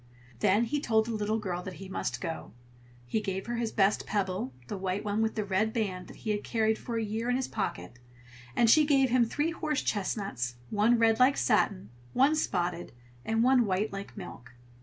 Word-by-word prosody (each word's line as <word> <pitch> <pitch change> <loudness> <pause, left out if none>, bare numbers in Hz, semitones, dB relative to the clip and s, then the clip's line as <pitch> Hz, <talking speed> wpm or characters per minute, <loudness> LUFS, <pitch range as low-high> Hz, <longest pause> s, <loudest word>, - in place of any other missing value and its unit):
Then 205 - +3
he 290 +5 -1
told 220 -5 +2
the 235 - -4
little 215 0 0
girl 185 -5 -3
that 185 0 -7
he 195 - -9
must 190 - -3
go; 165 -3 -4
and 120 0 -26
he 215 - -1
gave 195 -2 -3
her 240 0 -3
his 230 -2 -1
best 195 0 +2
pebble, 190 -9 -1 0.2
the - - -4
white 190 +1 -2
one 210 +1 0
with 220 0 0
the 215 - -1
red 205 +3 +1
band, 190 -6 -2
that - - -12
he 215 - -3
had 210 0 -2
carried 220 -1 +1
for 235 -2 -4
a 225 - 0
year 220 +3 -2
in 250 - +2
his 260 0 -1
pocket; 120 - -4 0.6
and 235 - +4
she 305 +7 +7
gave 270 -4 +3
him 245 -1 +4
three 295 +8 -1
horse 310 -3 -2
chestnuts, 190 - -2 0.2
one 220 +3 +4
red 225 -1 +3
like 260 +2 +5
satin, 200 - +1 0.2
one 270 +4 +4
spotted, 175 - -1 0.3
and 225 +1 +1
one 255 -1 +5
white 195 +2 0
like 195 0 -7
milk. 120 +1 -9
215 Hz, 210 wpm, -29 LUFS, 190-235 Hz, 0.6 s, she